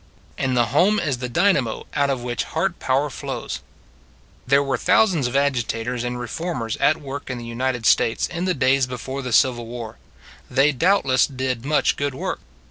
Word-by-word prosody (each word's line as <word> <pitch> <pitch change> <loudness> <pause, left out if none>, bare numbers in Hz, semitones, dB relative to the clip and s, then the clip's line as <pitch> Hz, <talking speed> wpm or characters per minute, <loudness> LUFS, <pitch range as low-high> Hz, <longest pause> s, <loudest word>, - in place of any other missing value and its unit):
And 130 -2 -1
the 120 - +4
home 205 +8 +4
is 140 -7 -1
the 125 -1 -4
dynamo 140 - +1
out 140 -1 +1
of 130 -3 -2
which 120 -2 -2
heart - - -2
power 135 +2 0
flows. - - -5 0.9
There 140 +2 +4
were 135 -1 0
thousands 180 - +3
of 125 - -5
agitators 120 -3 0
and 125 0 -3
reformers 125 -2 -3
at 155 - +3
work 140 -2 -7
in 130 - -3
the 120 - -7
United 120 0 -2
States 115 - +3
in 175 +1 -4
the 185 -1 +1
days 130 -1 +3
before 130 +2 -5
the 125 -2 -5
Civil 120 -1 +3
War. 115 -2 -7 0.5
They 140 +3 +4
doubtless 140 -3 +3
did 130 -3 -3
much 150 +1 +2
good 140 -2 -2
work. - - -3
130 Hz, 180 wpm, -22 LUFS, 120-145 Hz, 0.9 s, the